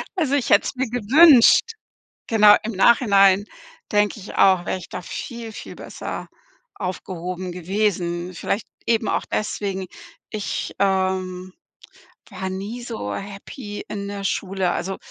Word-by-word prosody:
Also 295 -6 +1
ich 255 -4 -1
hätte 200 - +5
es - - -4
mir 255 -2 -2
gewünscht. 250 +3 +6 0.7
Genau, 210 -2 +7
im 225 - -3
Nachhinein 200 -2 +5 0.5
denke 210 +1 +2
ich 195 - -10
auch, 185 -2 +4
wäre 185 - -1
ich 175 - -11
da - - -6
viel, 230 +4 -7
viel - - -9
besser - - -7 0.5
aufgehoben 180 -1 -5
gewesen. 180 -1 -2
Vielleicht 200 +5 -2 0.2
eben 225 -1 +1
auch - - 0
deswegen. 195 -2 -2 0.4
Ich, 210 -2 -4
ähm, 185 -1 0 0.8
war 190 0 -5
nie 205 +6 -5
so 220 - -5
happy 205 +2 -7
in 200 -1 -5
der 200 -1 -6
Schule. 190 -2 -1
Also 190 +2 -3
200 Hz, 135 wpm, -22 LUFS, 185-220 Hz, 0.8 s, Genau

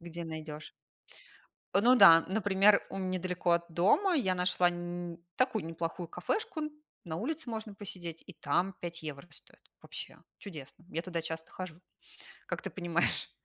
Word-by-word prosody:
где 170 0 -6
найдёшь. 155 -1 -7 1.0
Э, 195 - +6
ну 250 +2 +7
да, 165 -7 +10
например, 200 0 +4
у - - -5
м 190 -1 -2
недалеко 180 -1 0
от 170 0 +2
дома 220 - +4
я 190 - +2
нашла 180 0 +3
нь 175 0 -5 0.2
такую 255 -8 +1
неплохую 165 +1 -4
кафешку, 345 - -2 0.4
на 160 -2 -4
улице 290 - -3
можно 220 -2 -5
посидеть 175 -5 -7
и - - -9
там 175 +5 0
5 170 -1 -5
евро 150 -1 -6
стоит. - - -13 0.2
Вообще, - - -7 0.2
чудесно. 160 -4 -10
Я 165 - -2
туда 170 -2 -3
часто 160 0 -5
хожу. 180 -3 -7 0.7
Как - - -3
ты - - -4
понимаешь, 175 -1 0
175 Hz, 155 wpm, -32 LUFS, 165-195 Hz, 1.0 s, да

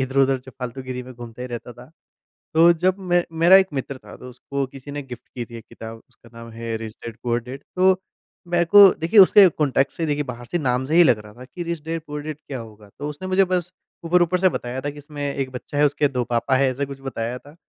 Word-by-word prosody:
इधर-उधर 135 0 +2
जो 130 +1 -13
फ़ालतू 125 +1 -5
गिरी 130 -1 -5
में 125 +1 -11
घूमते 120 0 -9
ही 125 - -5
रहता 120 0 -7
था। 125 +3 -15 0.6
तो 165 +2 +7
जब 185 +3 0
मैं 175 -2 +1 0.2
मेरा 175 +3 +8
एक 195 0 +5
मित्र 135 0 -4
था - - -13
तो 125 - -11
उसको 135 +2 -4
किसी 135 +1 -11
ने 145 0 -5
गिफ्ट 125 -3 -11
की 120 - -3
थी 115 0 -11
एक 115 - -10
किताब, 115 0 -10
उसका 115 - -21
नाम 115 0 -10
है 115 0 -4
रिच 110 -1 -7
डैड 115 -2 -7
पुअर 120 -1 0
डैड 130 +3 -9
तो, 185 0 +4 0.5
मेरको 175 +4 +7
देखिए 170 +7 +2
उसके 195 +1 +8
कॉन्टेक्स्ट 140 -4 0
से 165 - -1
देखिए 150 0 0
बाहर 120 -2 -8
से 175 - +1
नाम 130 -3 0
से 155 - -1
ही 175 - +8
लग 120 -8 +4
रहा 105 - -13
था 125 - -11
की 175 +7 -8
रिच 170 -2 -4
डैड 165 0 -4
पुअर 150 0 -5
डैड 155 0 -5
क्या 135 - -5
होगा? 105 -2 -13
तो 145 - -4
उसने 150 +6 -6
मुझे 190 +1 +4
बस 180 0 -1 0.3
ऊपर-ऊपर 175 +1 +3
से 185 - +4
बताया 125 -6 -4
था 145 +2 -3
कि 145 - -12
इसमें 145 0 -8
एक 135 -1 -3
बच्चा 130 +3 -6
है, 150 - +5
उसके 145 0 +1
2 125 -3 -2
पापा 120 +3 0
है 135 0 +3
ऐसा 140 +3 -2
कुछ 135 0 -9
बताया 125 -2 -4
था। 145 +3 -17
135 Hz, 255 wpm, -22 LUFS, 125-165 Hz, 0.6 s, मेरा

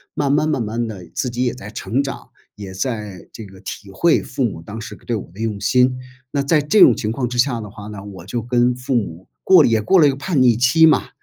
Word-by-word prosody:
慢 140 -1 0
慢 155 +1 +2
慢 125 - 0
慢 115 +2 -3
地 95 -5 -8
自 125 - -2
己 125 +2 -2
也 120 - 0
在 105 -4 -10
成 115 +4 -2
长， 140 -1 -7 0.3
也 100 -2 -9
在 105 -3 -5
这 110 - -9
个， 95 -1 -15
体 100 -2 -8
会 170 - +2
父 130 +1 -3
母 95 -8 -3
当 110 +5 -8
时 - - -8
个 - - -22
对 120 - -1
我 100 - -6
的 95 - -16
用 110 -3 -3
心。 125 +4 +2 0.3
那 140 - 0
在 150 +2 +2
这 150 +9 +2
种 - - +8
情 110 0 -2
况 125 -1 -2
之 125 - -5
下 120 -2 +1
的 105 - -8
话 105 0 -11
呢， 100 -2 -8
我 95 -4 -10
就 115 +4 -3
跟 120 +1 +1
父 125 +1 -3
母 95 -6 -3 0.2
过 185 -4 +7
了 130 - +4
也 110 -1 +2
过 185 - +3
了 150 - +6
一 - - +4
个 135 - -2
叛 140 0 -1
逆 120 -3 +4
期 130 +6 +5
嘛。 - - +2
120 Hz, 290 characters per minute, -19 LUFS, 105-135 Hz, 0.3 s, 种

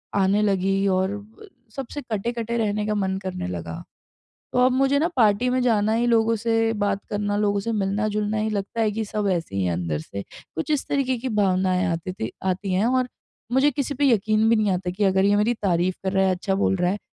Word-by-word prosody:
आने 200 +1 +3
लगीं 195 -1 +1
और 190 +1 +1
ब 220 - -14 0.3
सबसे 275 +2 -5
कटे-कटे 235 0 -3
रहने 210 -2 0
का 210 - 0
मन 190 -2 -1
करने 185 - -4
लगा। 85 -2 -6 0.7
तो - - 0
अब 255 - +2
मुझे 270 +2 +2
ना 325 - +2
पार्टी 220 +1 +3
में 255 +1 +1
जाना 220 -3 +2
ही 235 +1 +1
लोगों 230 -1 +3
से 225 0 +1
बात 200 -1 0
करना 205 0 -1
लोगों 205 -1 +1
से 230 +3 -3
मिलना-जुलना 210 +1 -1
ही 215 +1 0
लगता 205 +2 -3
है 220 - +2
कि 220 +1 -2
सब 210 0 -2
ऐसे 165 - -3
ही 95 - +1
है 90 - 0
अंदर 85 -3 -2
से। 100 +5 -7
कुछ 160 - -8
इस 295 -3 0
तरीके 265 -2 +1
की 260 - -3
भावनाएँ 185 -4 +1
आतीं 170 +3 -4
थीं 110 -11 -4 0.2
आती 190 +1 -2
हैं 195 +5 +2
और 255 0 +1 0.4
मुझे 265 +3 +4
किसी 285 +1 -2
पे 280 +1 +2
यकीन 220 -1 +3
भी 230 - +5
नहीं 210 -2 +2
आता 180 0 -2
कि 200 +3 -1
अगर 190 0 +3
ये 205 0 +4
मेरी 225 +4 +2
तारीफ़ 180 -1 +1
कर 190 - 0
रहा 190 0 +3
है 185 - +2
अच्छा 190 +2 -2
बोल 195 -1 +1
रहा 180 -1 +1
है 205 - -2
205 Hz, 230 wpm, -24 LUFS, 190-230 Hz, 0.7 s, भी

